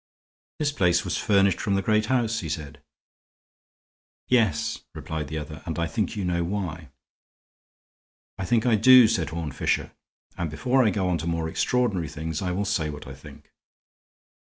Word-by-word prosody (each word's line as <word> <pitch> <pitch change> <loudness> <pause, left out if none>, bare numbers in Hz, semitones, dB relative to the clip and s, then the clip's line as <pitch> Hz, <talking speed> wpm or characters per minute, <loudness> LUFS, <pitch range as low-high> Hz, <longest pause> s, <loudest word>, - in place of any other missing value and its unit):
"This 150 -1 0
place 90 -9 +2
was - - -2
furnished 100 -3 +2
from 100 - 0
the 95 - 0
great 110 +1 +2
house," 115 -3 +1
he 80 - -5
said. 75 -1 -6 1.5
"Yes," 115 -10 +2 0.2
replied 80 -2 -5
the 80 +2 -5
other, 75 +1 -7
"and 80 -2 -3
I 85 - 0
think 110 +5 -2
you 100 -3 -3
know 85 -1 0
why." 85 -5 -4 1.5
"I 95 - -2
think 115 +3 +1
I 115 -3 +4
do," 125 +2 +8
said 95 -9 0
Horne 80 -1 -4
Fisher, - - -1 0.5
"and 85 -2 -1
before 125 - +2
I 110 - +4
go 95 -1 -1
on 90 -2 0
to 80 - -4
more 85 -1 -1
extraordinary 95 - 0
things 80 +1 -4
I 90 -2 -1
will, 100 +3 -1
say 80 -5 0
what 75 0 -8
I 70 - -8
think. 65 - -14
90 Hz, 175 wpm, -25 LUFS, 80-110 Hz, 1.5 s, do